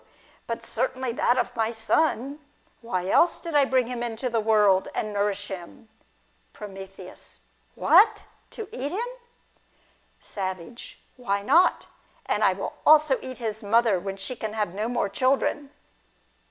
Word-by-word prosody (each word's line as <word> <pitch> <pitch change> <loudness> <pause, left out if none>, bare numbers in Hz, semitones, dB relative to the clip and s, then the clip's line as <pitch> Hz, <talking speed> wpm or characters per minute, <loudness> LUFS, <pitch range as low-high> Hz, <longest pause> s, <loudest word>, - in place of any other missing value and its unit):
But - - -4
certainly 255 -1 -1
that 245 +1 +1
of - - -1
my 225 -1 +1
son. 265 +4 0 0.4
Why 185 -6 -3
else 335 - +4
did 335 - -7
I 290 -2 +5
bring 260 -2 +2
him 245 0 -5
into 240 +1 -3
the 230 - +1
world, 210 -3 +3
and 215 -1 -2
nourish 205 0 -1
him? 190 +4 -9 0.6
From. 205 -2 -9 1.0
What! 435 -1 +5 0.3
To 440 - -8
eat 285 - -4
him? 460 +5 -2 1.1
Savage. 190 +3 -7 0.2
Why 200 -5 -1
not? 345 - +4 0.4
and - - 0
I - - +5
will - - -5
also 305 -3 +5
eat 255 -1 -6
his 220 -2 -4
mother 220 -2 +3
when 195 +1 -5
she 195 +6 -4
can 220 -2 -5
have 210 -5 -1
no 215 +4 -2
more 245 -4 0
children. 270 +5 0
230 Hz, 145 wpm, -25 LUFS, 205-260 Hz, 1.1 s, I